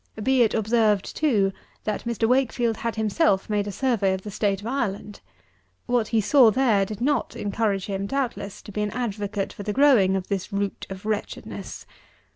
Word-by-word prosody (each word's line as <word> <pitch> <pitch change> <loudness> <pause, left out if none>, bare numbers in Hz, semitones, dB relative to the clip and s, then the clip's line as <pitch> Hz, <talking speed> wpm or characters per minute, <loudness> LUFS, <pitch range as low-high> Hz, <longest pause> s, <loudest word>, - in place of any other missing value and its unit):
Be 265 +1 +3
it 225 - +3
observed, 215 -2 +1
too, 210 -11 +2 0.3
that 215 +1 -3
Mr. 230 -1 0
WAKEFIELD 245 -2 +1
had 230 -2 -3
himself 215 -2 +1
made 205 -1 0
a - - -3
survey 220 -5 +1
of 190 - -8
the 210 - -6
state 200 -1 0
of 205 - -11
Ireland. 210 -5 -3 0.7
What 240 -3 +1
he 225 - +1
saw 230 +3 +6
there 215 -4 +2
did 215 +1 -7
not 290 +3 0
encourage 200 -2 -1
him, 195 -1 -3
doubtless, 240 -6 -3
to - - -10
be 210 - -3
an 210 - 0
advocate 205 -4 -3
for - - -9
the 210 +1 -3
growing 245 -9 +5
of 190 -1 -3
this 200 +1 -3
root 200 0 -3
of 190 +1 -8
wretchedness. 215 -1 -5
210 Hz, 185 wpm, -24 LUFS, 200-240 Hz, 0.7 s, saw